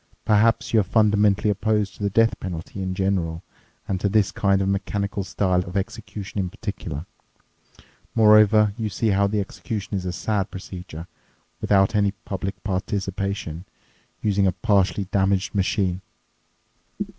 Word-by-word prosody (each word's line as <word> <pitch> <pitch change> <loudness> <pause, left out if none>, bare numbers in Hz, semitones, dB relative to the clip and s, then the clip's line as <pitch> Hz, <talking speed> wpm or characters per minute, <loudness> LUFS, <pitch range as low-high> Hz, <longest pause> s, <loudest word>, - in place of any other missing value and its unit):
Perhaps 110 +3 +3
you 110 - +6
are - - +3
fundamentally 105 -1 +3
opposed 105 0 0
to - - -14
the 100 - +1
death 115 +3 +2
penalty 90 +1 -6
in 95 0 -3
general 95 -3 -1 0.4
and 95 -1 -2
to 100 - +2
this 105 -2 +2
kind 100 -1 +2
of 95 - 0
mechanical 100 +1 -1
style 90 -1 0
of 90 +2 -5
execution 105 -1 -5
in 95 -2 -1
particular. 90 -7 -6 1.1
Moreover, 105 -1 +6
you 110 -1 -1
see 110 +2 0
how 100 0 +3
the 105 +1 0
execution 100 +1 -4
is 95 - -2
a - - -1
sad 100 +2 -1
procedure, 90 -3 -8 0.6
without 95 0 +3
any 100 -1 +2
public 95 0 -4
participation, 95 -3 -3 0.6
using 100 -2 +2
a 95 - +1
partially 100 -4 +1
damaged 95 -1 +1
machine. 95 -2 0
100 Hz, 145 wpm, -23 LUFS, 95-105 Hz, 1.1 s, you